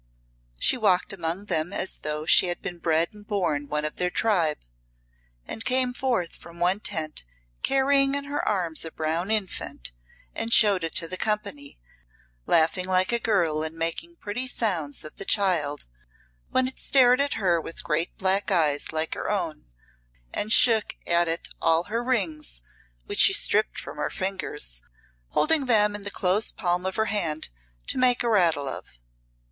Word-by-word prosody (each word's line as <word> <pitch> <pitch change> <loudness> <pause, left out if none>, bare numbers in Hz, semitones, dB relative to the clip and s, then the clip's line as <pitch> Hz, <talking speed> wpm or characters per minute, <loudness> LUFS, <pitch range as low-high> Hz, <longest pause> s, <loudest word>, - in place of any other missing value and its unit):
She - - +3
walked 200 -5 +1
among 175 +2 -3
them 160 -2 -1
as 190 - -1
though 150 0 -3
she 180 - +5
had 175 - -2
been 175 -2 -6
bred 165 0 +1
and 210 0 -13
born 170 -9 -1
one 150 +1 -2
of 150 - -5
their 180 0 0
tribe, 175 -7 +1 0.9
and 225 - -4
came 255 -1 +3
forth 245 -10 -2
from 170 0 -13
one 180 +3 +1
tent 155 - -3 0.4
carrying 275 0 +3
in 280 - -1
her 285 +1 -3
arms 175 -6 0
a 165 - -6
brown 165 +5 -2
infant, 190 - -2 0.4
and 230 - -2
showed 200 -6 +6
it 165 - -4
to 170 -2 +1
the 185 - -4
company, 200 -11 -3 0.7
laughing 170 +3 +2
like 185 +1 +2
a 235 - +1
girl 170 -9 0
and 160 +1 -3
making 165 - -3
pretty 245 -2 -4
sounds 175 - -1
at 155 - -8
the - - -3
child 175 -9 +1 0.6
when 260 0 +1
it 260 - -6
stared 255 -1 +5
at 285 - 0
her 180 -6 +1
with 165 - -8
great 160 +2 -2
black 190 +1 +1
eyes 155 -6 +1
like 160 0 -1
her - - -4
own, - - -3 0.7
and 215 - -1
shook 225 -2 +5
at 170 0 +2
it 165 +1 -2
all 165 +1 +3
her 230 +5 -3
rings, 160 - -1 0.4
which - - -4
she - - +7
stripped - - +2
from - - -9
her - - -2
fingers, 185 - -2 0.5
holding 305 - +2
them 210 -3 +4
in 205 - -3
the 205 - -2
closed 195 +2 0
palm 180 -1 -1
of 190 - -4
her 220 - +1
hand 165 -8 -2 0.4
to - - -2
make 250 -1 +3
a 240 - 0
rattle 170 -9 +2
of. 60 - -8
185 Hz, 175 wpm, -25 LUFS, 160-220 Hz, 0.9 s, she